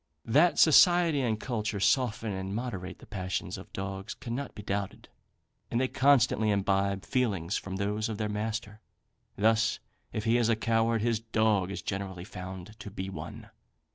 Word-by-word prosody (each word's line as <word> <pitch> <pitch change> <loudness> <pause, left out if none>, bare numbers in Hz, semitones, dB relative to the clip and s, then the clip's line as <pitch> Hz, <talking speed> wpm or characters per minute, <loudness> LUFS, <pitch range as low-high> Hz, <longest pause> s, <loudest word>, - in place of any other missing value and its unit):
That 150 +10 +4
society 170 -1 +6
and 110 -4 0
culture 110 -4 -2
soften 115 0 +1
and 95 +1 -4
moderate 105 -6 -4
the - - -14
passions 95 -2 -3
of - - -10
dogs 95 +3 -5
cannot 135 +1 -5
be 105 - -8
doubted, 100 -1 -4 0.6
and 115 - 0
they 130 - +2
constantly 130 -5 +3
imbibe 100 -1 +1
feelings 100 -10 0
from 95 -1 -4
those 105 +2 -1
of 110 - -4
their 105 0 -1
master. 105 0 -4 0.6
Thus, 110 +2 +3 0.3
if 110 - -3
he 115 +1 +3
is 120 -1 +2
a 115 - +4
coward, 115 0 +1
his 115 -2 +1
dog 110 -4 +1
is 100 - -5
generally 95 -2 -4
found 95 +2 -8
to 105 +1 -7
be 95 -1 -5
one. - - -8
110 Hz, 165 wpm, -29 LUFS, 100-115 Hz, 0.6 s, society